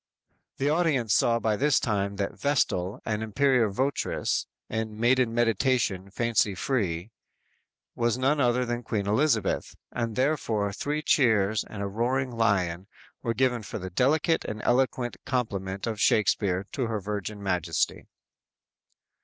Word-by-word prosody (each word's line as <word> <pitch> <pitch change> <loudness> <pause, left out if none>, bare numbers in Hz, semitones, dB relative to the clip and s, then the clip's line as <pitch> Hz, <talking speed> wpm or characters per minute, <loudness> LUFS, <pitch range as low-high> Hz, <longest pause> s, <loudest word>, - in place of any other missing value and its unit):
"_ - - -53
The 135 - 0
audience 150 - +2
saw 115 +2 +3
by 110 -2 0
this 145 +4 +3
time 100 -5 -1
that 100 0 -2
the - - -20
"Vestal" 105 -10 0
and 105 -1 -1
"Imperial 120 +1 +2
Voteress" 135 +8 -1 0.2
in 110 -1 -4
"maiden 125 0 +3
meditation, 115 -4 +1
fancy 110 -1 +1
free" 95 -5 -1 0.8
was 120 0 0
none 135 +3 +2
other 125 0 +2
than 120 0 -2
Queen 105 -3 -2
Elizabeth, 110 +1 +1 0.2
and 115 -2 -3
therefore 115 -7 0
three 150 +7 -2
cheers 110 -7 +3
and 100 -2 -6
a - - -1
roaring 125 +5 -1
lion 100 -6 0 0.3
were 115 -1 -2
given 125 -2 +1
for 105 - -6
the 95 -2 -6
delicate 150 - +2
and 105 0 -6
eloquent 125 -4 +1
compliment 100 -7 -2
of 110 -2 -3
Shakspere 100 -3 +2
to 130 -4 -2
her 110 -2 -2
Virgin 105 +1 -5
Majesty! 90 -4 -1
115 Hz, 145 wpm, -27 LUFS, 100-130 Hz, 0.8 s, saw